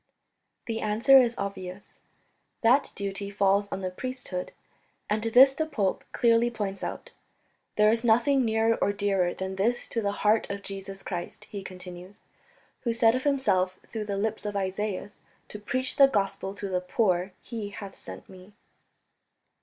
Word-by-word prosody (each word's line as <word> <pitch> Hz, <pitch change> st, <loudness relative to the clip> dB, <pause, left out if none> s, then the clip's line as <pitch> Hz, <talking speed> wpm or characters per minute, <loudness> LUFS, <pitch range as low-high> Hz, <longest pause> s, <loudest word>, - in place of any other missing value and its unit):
The 225 Hz, -1 st, -3 dB
answer 230 Hz, +6 st, +6 dB
is 235 Hz, -1 st, 0 dB
obvious 195 Hz, -1 st, -6 dB, 0.6 s
that 250 Hz, +5 st, +4 dB
duty 200 Hz, 0 st, -3 dB
falls 200 Hz, 0 st, +2 dB
on 195 Hz, -, -3 dB
the 185 Hz, -1 st, -3 dB
priesthood, 250 Hz, -4 st, -5 dB, 0.6 s
and 215 Hz, +1 st, +1 dB
this 250 Hz, +5 st, +6 dB
the 315 Hz, +3 st, -2 dB
pope 210 Hz, -11 st, -1 dB
clearly 235 Hz, 0 st, +3 dB
points 205 Hz, -4 st, -4 dB
out. -, -, -5 dB, 0.6 s
"There 210 Hz, 0 st, +5 dB
is 230 Hz, +1 st, 0 dB
nothing 245 Hz, +4 st, +4 dB
nearer 225 Hz, 0 st, +2 dB
or 205 Hz, -, +2 dB
dearer 195 Hz, -3 st, +1 dB
than 190 Hz, 0 st, -4 dB
this 235 Hz, +5 st, 0 dB
to 230 Hz, -, -1 dB
the 200 Hz, -1 st, 0 dB
heart 215 Hz, +1 st, +3 dB
of 200 Hz, 0 st, -5 dB
Jesus 195 Hz, 0 st, -7 dB
Christ," 175 Hz, -2 st, -5 dB
he 200 Hz, -, -5 dB
continues, 185 Hz, 0 st, -10 dB, 0.6 s
"who 235 Hz, -3 st, -1 dB
said 230 Hz, 0 st, +4 dB
of 255 Hz, +2 st, -2 dB
Himself 190 Hz, -10 st, +2 dB
through 220 Hz, -2 st, -5 dB
the 200 Hz, -1 st, -3 dB
lips 220 Hz, +2 st, -2 dB
of 205 Hz, -1 st, -4 dB
Isaias, 200 Hz, +1 st, -3 dB, 0.3 s
'to 210 Hz, -, -7 dB
preach 255 Hz, +5 st, -2 dB
the 275 Hz, -1 st, +8 dB
Gospel 195 Hz, -4 st, -1 dB
to 205 Hz, -, -5 dB
the 180 Hz, -1 st, -1 dB
poor 185 Hz, -1 st, 0 dB
He 220 Hz, -4 st, -6 dB
hath 200 Hz, -1 st, -8 dB
sent -, -, -9 dB
me'." 185 Hz, +2 st, -14 dB
205 Hz, 160 wpm, -27 LUFS, 195-230 Hz, 0.6 s, the